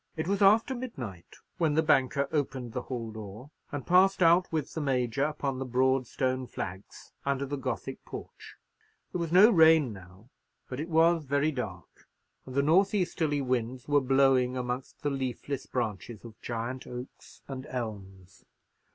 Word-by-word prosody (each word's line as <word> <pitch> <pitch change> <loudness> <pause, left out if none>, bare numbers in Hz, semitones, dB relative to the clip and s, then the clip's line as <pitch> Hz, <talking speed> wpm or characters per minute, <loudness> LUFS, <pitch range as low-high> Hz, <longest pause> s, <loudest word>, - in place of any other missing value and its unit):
It 160 - -2
was 200 +1 0
after 220 +6 +5
midnight 125 - -7 0.2
when 160 -3 +2
the 160 - +3
banker 140 -2 +2
opened 135 -6 -2
the 125 - -2
hall 120 -3 -5
door, 110 +5 -9 0.2
and 145 -3 -5
passed 185 +1 +4
out 170 +2 +4
with 155 -4 -2
the 160 - -3
Major 130 -1 0
upon 140 -3 -2
the - - -2
broad 130 0 +2
stone 130 0 -1
flags 95 -2 -8
under 140 0 -1
the 140 +1 -3
Gothic 130 0 -4
porch. - - -10 0.6
There 180 - -3
was 165 -1 -3
no 200 +6 +8
rain 160 - +5
now; 95 +5 -15 0.4
but 125 - -6
it 160 +3 -4
was 165 0 +3
very 145 +3 +1
dark, 105 - -7 0.4
and 130 - -8
the 140 - +3
north 190 +7 +4
easterly 160 -6 0
winds 125 -1 -2
were 145 -1 +4
blowing 130 -1 +3
amongst 125 +1 -5
the 145 - 0
leafless 135 +1 -4
branches 115 -2 -4
of 110 -2 -12
giant 120 +2 -4
oaks 125 +1 -10
and 135 -1 -6
elms. 100 -7 -7
135 Hz, 165 wpm, -29 LUFS, 125-155 Hz, 0.6 s, no